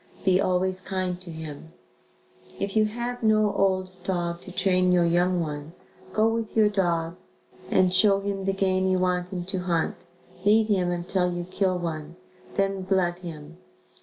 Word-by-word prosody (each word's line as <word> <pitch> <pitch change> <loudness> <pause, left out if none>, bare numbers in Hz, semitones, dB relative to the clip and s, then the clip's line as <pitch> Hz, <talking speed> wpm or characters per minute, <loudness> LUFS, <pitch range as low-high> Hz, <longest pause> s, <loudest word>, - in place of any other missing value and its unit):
Be 190 0 +4
always 185 0 0
kind 185 -2 -3
to 185 - -9
him. 160 0 -8 0.9
If 195 +1 -3
you 215 0 +4
have 240 +3 -4
no 215 -2 +3
old 190 -2 +1
dog 175 -2 -2
to 185 - -10
train 185 0 +2
your 175 -1 +4
young 175 +2 +2
one, 150 -1 -4 0.4
go 215 +1 +3
with 225 -1 -2
your 215 -1 +5
dog 170 -4 0 0.5
and 185 -1 +3
show 195 +1 +6
him 200 -1 -3
the 195 - +2
game 190 -1 +1
you 185 0 +2
want 180 -1 0
him 180 -2 -4
to 190 0 -3
hunt, 175 -3 0 0.5
lead 215 +2 +5
him 185 -4 +2
until 180 +1 0
you 175 0 -3
kill 185 +1 0
one, 165 -2 -5 0.4
then 195 -1 0
blood 185 -2 0
him. 165 -2 -9
185 Hz, 165 wpm, -26 LUFS, 175-195 Hz, 0.9 s, show